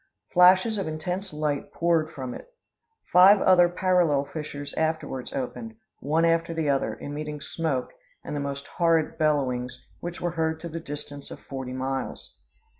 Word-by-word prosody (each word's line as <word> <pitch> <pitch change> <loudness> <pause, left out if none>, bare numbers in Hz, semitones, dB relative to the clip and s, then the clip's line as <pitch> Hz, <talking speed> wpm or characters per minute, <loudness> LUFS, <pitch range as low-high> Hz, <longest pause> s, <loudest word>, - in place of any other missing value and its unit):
Flashes 185 +4 +6
of 195 - -2
intense 180 +5 -3
light 150 -2 -2
poured 165 -2 +1
from 130 -4 -6
it. - - -11 0.6
Five 190 +3 +8
other 180 -2 +5
parallel 175 -6 +2
fissures 145 -2 -6
afterwards 160 -5 -2
opened, 225 - -5 0.2
one 160 +4 +1
after 165 0 +1
the 160 -2 -1
other, 135 - -1
emitting 150 +1 -5
smoke, 145 -4 -2 0.3
and - - -5
the - - -1
most 140 0 -4
horrid 165 -2 +1
bellowings, 125 -5 0
which 175 0 -6
were 175 - -1
heard 160 -1 -1
to 170 - -5
the 165 +1 -5
distance 145 -2 -7
of - - -9
forty 130 -2 -6
miles. 130 +1 -4
155 Hz, 155 wpm, -26 LUFS, 140-175 Hz, 0.6 s, Five